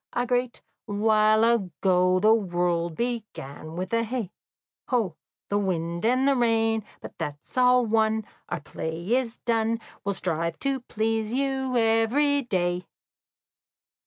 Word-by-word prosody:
"A 245 - 0
great 245 0 -1 0.2
while 215 +1 +3
ago 185 -4 +2
the 215 +3 +5
world 175 -5 0
begun, 210 - -5
With 185 +1 -4
hey, 230 -3 -1 0.6
ho, 225 -10 0 0.3
the 205 - +1
wind 170 -3 -2
and 255 +3 +3
the 280 - +4
rain, 225 -2 +2 0.2
But - - -11
that's 145 0 -6
all 250 -1 +5
one, 220 -1 +1 0.2
our 165 - -3
play 160 +7 -4
is 250 -3 -1
done, 225 -1 0
And 230 - -4 0.2
we'll 200 0 -1
strive 170 -2 -2
to 275 -1 0
please 220 -2 -2
you 265 -1 0
every 235 +6 +3
day." 180 -6 -1
220 Hz, 130 wpm, -26 LUFS, 180-240 Hz, 0.6 s, the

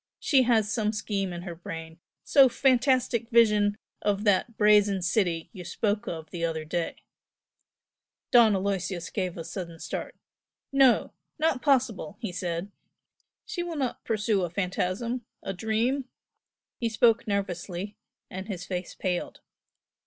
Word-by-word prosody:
She 270 -3 +4
has 220 -3 +4
some 215 0 0
scheme 200 -3 -2
in 175 0 -6
her 175 -2 -5
brain, 165 -1 -8 0.2
so 270 -2 +6
fantastic 255 -2 +2
vision 210 -3 +4 0.2
of 205 0 0
that 215 +2 +2
Brazen 205 -3 +4
City 175 -3 0
you 185 -4 -8
spoke 210 +5 -1
of 160 -2 -6
the 170 -1 -4
other 160 -2 -1
day 165 +2 -2 0.7
" - - -65
Don 230 -4 +7
Aloysius 185 -2 -2
gave 185 -4 -2
a 165 - -4
sudden 170 0 -6
start. - - -5 0.6
"No! 270 -3 +4 0.2
not 310 -5 +1
possible!" 255 - +1
he - - -4
said 175 +1 -3 0.7
"She 430 -4 -4
will 345 -1 -4
not 265 -5 -2
pursue 215 -2 +1
a 175 - -1
phantasm, 195 +7 -2 0.2
a 195 - -3
dream!" 225 +7 0 0.7
He 235 - 0
spoke 230 +1 +3
nervously, 195 0 -3 0.3
and 190 +2 -7
his 180 -4 -5
face 180 -2 -5
paled. 180 -2 -3
205 Hz, 140 wpm, -27 LUFS, 180-235 Hz, 0.7 s, Don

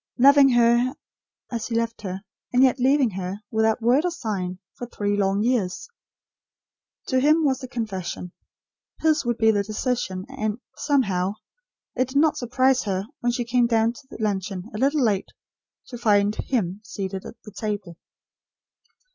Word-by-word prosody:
Loving 275 +1 +7
her, 240 +2 +3 0.6
as 230 -2 -3
he 230 - -3
loved 230 0 -1
her; 190 -2 -5 0.3
and 250 +1 +4
yet 260 0 +3
leaving 265 -1 +3
her, 190 +2 -5
without 220 0 +1
word 250 +6 +4
or 355 - +1
sign, 195 - -4 0.2
for 245 - -7
three 205 -3 -1
long 200 0 +1
years. 220 -7 0 1.2
To 260 -1 +2
hire, 300 +3 +5
was 275 -5 +1
the 260 - -7
confession; 190 -7 -4 0.7
his 310 -3 +2
would 240 -1 0
be 220 -1 +4
the 205 -2 +1
decision; 215 -3 -2
and, 215 0 -3 0.2
somehow, 200 - +1 0.6
it 255 - 0
did 260 +2 -3
not 310 +1 +4
surprise 255 +2 +2
her, 190 -2 -1 0.2
when 240 - +1
she 240 0 -2
came 240 0 +2
down 230 0 +2
to 270 +2 -15
luncheon, 200 -1 -3
a 210 - -4
little 280 +2 +2
late, 205 -4 +1 0.6
to 245 - -7
find 205 -2 +3
HIM 210 -6 -2
seated 195 -1 -5
at - - -9
the 210 - -11
table. 205 -4 -4
230 Hz, 160 wpm, -24 LUFS, 200-255 Hz, 1.2 s, Loving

